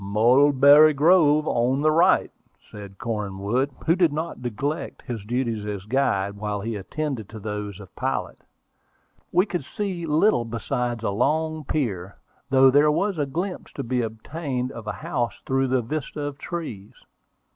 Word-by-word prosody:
"Mulberry 140 +8 +6
Grove 155 -1 +4
on 125 +4 +1
the 155 +1 +3
right," 165 +3 +3 0.4
said 100 -2 -10
Cornwood, 105 +2 -2 0.2
who 165 - +4
did 175 -4 +3
not 160 -2 -4
neglect 125 +6 -4
his 115 -5 -5
duties 115 -1 -2
as 100 -2 -5
guide, 100 -5 0
while 105 0 -3
he 115 +2 -3
attended 125 +2 -4
to 110 - -9
those 105 -1 -5
of 100 -3 -13
pilot. 65 -1 -3 0.9
We 180 +3 +3
could 175 -7 -3
see 180 - -4
little 155 - +3
besides 115 +1 -3
a 100 - 0
long 155 +7 0
pier, 100 - -3 0.3
though 135 -1 +6
there 145 +3 +5
was 195 +2 0
a 145 - 0
glimpse 180 +7 -4
to - - -5
be 125 +1 -1
obtained 125 +3 -4
of 110 -2 -9
a - - 0
house 120 -2 -2
through 135 0 +1
the 130 -1 +1
vista 150 +4 -4
of 145 0 -5
trees. 135 - -6
130 Hz, 155 wpm, -24 LUFS, 110-155 Hz, 0.9 s, Mulberry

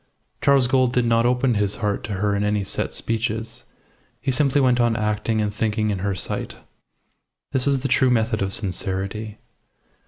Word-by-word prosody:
Charles 140 -2 +4
Gould 130 -1 +2
did 125 -1 +2
not 115 0 +3
open 125 0 +2
his 105 -1 0
heart 105 -3 -2
to 105 - -4
her 100 +1 0
in 100 - 0
any 105 0 0
set - - -3
speeches. 115 0 -3 0.5
He 135 - -1
simply 140 +1 +2
went 125 -2 +3
on 120 -1 +2
acting 105 0 -1
and 105 -1 -1
thinking 110 0 0
in 100 - -2
her 100 +1 -1
sight. - - -5 1.0
This 130 0 +1
is 140 -2 +2
the 135 - -1
true 130 -1 +3
method 110 -2 +1
of 95 0 -1
sincerity. 100 +2 -2
110 Hz, 180 wpm, -22 LUFS, 105-125 Hz, 1.0 s, Charles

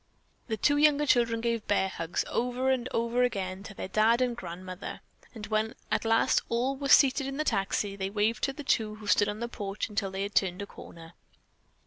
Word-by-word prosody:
The 220 -3 -2
two 290 +7 +3
younger 295 0 +4
children 235 -4 +2
gave 230 -2 -1
"bear 200 -2 +2
hugs," 165 -2 -3
over 250 +2 0
and 255 -1 -1
over 235 +2 0
again, 195 -6 -1
to 200 0 -10
their - - -5
dad 220 +4 +3
and 250 -2 +1
grandmother, 185 -1 -7 0.3
and 215 -2 -6
when 220 +1 -1 0.2
at - - 0
last 225 0 +3
all 245 +4 0
were 275 0 -4
seated 270 0 +5
in 275 0 -5
the 305 - 0
taxi, 195 -4 -1
they 190 -1 -3
waved 215 +2 0
to 275 - -3
the 295 - -8
two 215 -5 0
who 215 0 -12
stood 205 0 +3
on 210 +2 -5
the 235 - -1
porch 205 -2 -4
until 200 -2 -2
they 190 +1 -3
had 200 +1 -5
turned 190 +1 +1
a - - -5
corner. 165 -4 -12
220 Hz, 210 wpm, -29 LUFS, 200-250 Hz, 0.3 s, seated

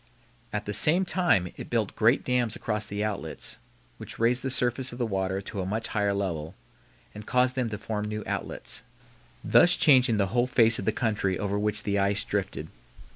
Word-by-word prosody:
At 105 0 -3
the 105 - -3
same 170 - +4
time 170 - +1
it - - -8
built 110 -4 -1
great 115 +4 +3
dams 125 -3 0
across 105 -1 -3
the 100 +1 -3
outlets 105 -3 -4 0.4
which - - -8
raised 120 +2 +2
the 135 - -2
surface 125 0 +2
of 120 - -8
the 125 - 0
water 95 -2 -2
to 100 0 -5
a - - -3
much 110 +3 -2
higher 105 -2 0
level 85 -4 -3 0.6
and 105 - -9
caused 125 0 +2
them 125 -3 -1
to 105 - -4
form 105 0 -4
new 105 0 -4
outlets, - - -4 0.6
thus 175 - +5
changing 130 -6 +4
the 100 -2 +1
whole 120 0 +2
face 115 -3 +4
of 100 - -5
the 110 - +2
country 105 -5 -1
over 100 0 -2
which 105 0 0
the 100 -1 0
ice 100 +1 +1
drifted. 100 -9 -3
105 Hz, 195 wpm, -27 LUFS, 100-120 Hz, 0.6 s, thus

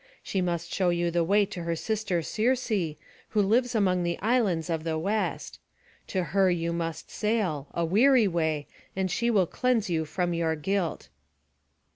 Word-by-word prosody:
She 190 - -1
must 170 -1 -2
show 185 -2 +2
you 175 0 0
the 170 0 +2
way 200 +4 +3
to 180 - -7
her 170 0 -1
sister 200 -2 -1
Circe, 245 +7 0 0.6
who 215 - 0
lives 240 +5 +2
among 185 -4 +2
the 170 0 -1
islands 205 -7 +1
of 165 -2 -2
the 160 -1 -1
West. 205 +7 -2 0.5
To 185 -2 -1
her 190 +4 +2
you 170 -1 0
must 165 -1 -4
sail, 200 -10 -1
a 170 - -1
weary 230 +6 +5
way, 160 -4 0 0.3
and 190 -1 -1
she 235 +6 0
shall 205 -6 +3
cleanse 230 0 0
you 160 -1 0
from 175 +2 -1
your 165 -1 0
guilt." 180 +2 -2
180 Hz, 170 wpm, -27 LUFS, 170-210 Hz, 0.6 s, weary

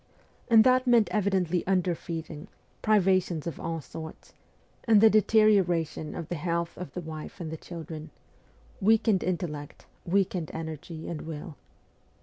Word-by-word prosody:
And 225 -2 +7
that 255 +1 +3
meant 235 -3 +5
evidently 190 -4 +1
underfeeding, 170 -3 -2 0.3
pri 215 0 +4
vations 185 -4 +1
of 170 - -5
all 165 -1 -3
sorts, 160 +4 -10 0.5
and 220 -3 +6
the 220 +1 +7
deterioration 195 -8 +3
of 165 -3 -5
the 175 - -3
health 170 0 -1
of 180 - -8
the 180 - -3
wife 155 +1 -8
and 165 -3 -5
the - - -4
children: 160 -1 -8 0.7
weakened 215 -1 +3
intellect, 165 -5 -4 0.2
weakened 180 -3 0
energy 160 0 -6
and 160 -3 -5
will. 155 -1 -7
175 Hz, 135 wpm, -28 LUFS, 160-200 Hz, 0.7 s, And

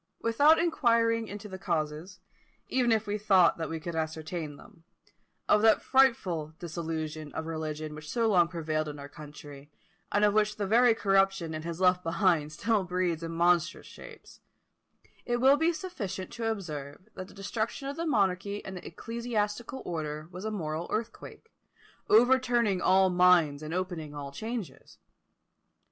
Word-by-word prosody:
Without 285 +8 +5
inquiring 230 -8 +2
into 205 +1 -8
the 190 -2 -8
causes, 165 +1 -3 0.5
even 250 -2 +1
if 220 -1 +2
we 210 0 -2
thought 190 -5 +4
that 160 - -3
we 165 - -4
could 170 +2 -6
ascertain 160 -1 -4
them, 165 +3 -17 0.6
of 210 - +4
that 220 0 +4
frightful 185 - +2
dissolution 160 -3 -5
of 160 - -4
religion 155 -1 -4
which 150 0 -10
so 230 -1 +1
long 180 -5 +4
prevailed 155 -3 -2
in 150 -1 -6
our 140 0 -8
country, 145 -1 -12 0.4
and 205 +1 +3
of 205 - +3
which 210 0 +2
the 205 - -2
very 230 +3 +4
corruption 195 -5 +1
it 155 0 -5
has 170 0 -5
left 180 -1 +3
behind 165 -3 +1
still 205 +5 0
breeds 180 -2 -1
in 165 0 -5
monstrous 170 0 +1
shapes, - - -13 0.8
it 240 0 -1
will 265 +3 +5
be 320 +3 +2
sufficient 210 - -6
to 230 -1 -3
observe 155 -6 -6
that 185 - -7
the - - -15
destruction 220 +6 -3
of 280 - -4
the 335 0 -3
monarchy 200 -4 0
and 190 - -7
the 180 - -8
ecclesiastical 230 +3 -3
order 155 -2 -4
was 185 +3 -8
a - - -1
moral 165 -5 -4
earthquake, 235 - -6 0.6
overturning 240 -4 +4
all 190 0 +4
minds, 175 -5 +4
and 155 0 -6
opening 175 -4 -4
all 140 -1 -6
changes. 220 - -7
185 Hz, 160 wpm, -29 LUFS, 160-220 Hz, 0.8 s, Without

